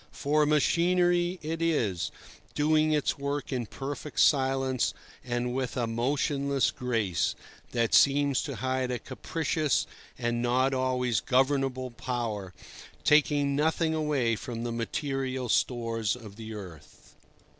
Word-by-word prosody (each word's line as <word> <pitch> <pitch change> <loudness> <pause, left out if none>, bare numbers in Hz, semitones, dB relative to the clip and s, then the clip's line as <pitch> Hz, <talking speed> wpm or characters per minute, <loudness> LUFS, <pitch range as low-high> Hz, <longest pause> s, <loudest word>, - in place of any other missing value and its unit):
For 150 +1 +1
machinery 175 +4 +2
it 160 +2 -3
is, 115 - 0 0.5
doing 155 +1 +3
its 150 -2 0
work 140 0 -3
in 120 -3 -2
perfect 140 +4 -6
silence 135 -2 +2 0.3
and 120 -1 -2
with 130 -1 -2
a 120 - +1
motionless 140 +3 0
grace, 115 -9 -1 0.4
that 115 -2 0
seems 140 -1 +4
to - - -4
hide 130 -1 -1
a 125 - -1
capricious 155 +2 -1 0.3
and 120 -1 -1
not 130 +2 +2
always 125 -3 +1
governable 130 -1 +1
power, 115 -6 -3 0.5
taking 145 -1 +3
nothing 160 +2 +1
away 145 -7 +1
from 115 +1 -6
the 120 - -2
material 130 +1 -2
stores 115 -3 0
of 110 -5 -11
the 110 0 -8
earth. 85 -7 -12
130 Hz, 125 wpm, -28 LUFS, 120-145 Hz, 0.5 s, seems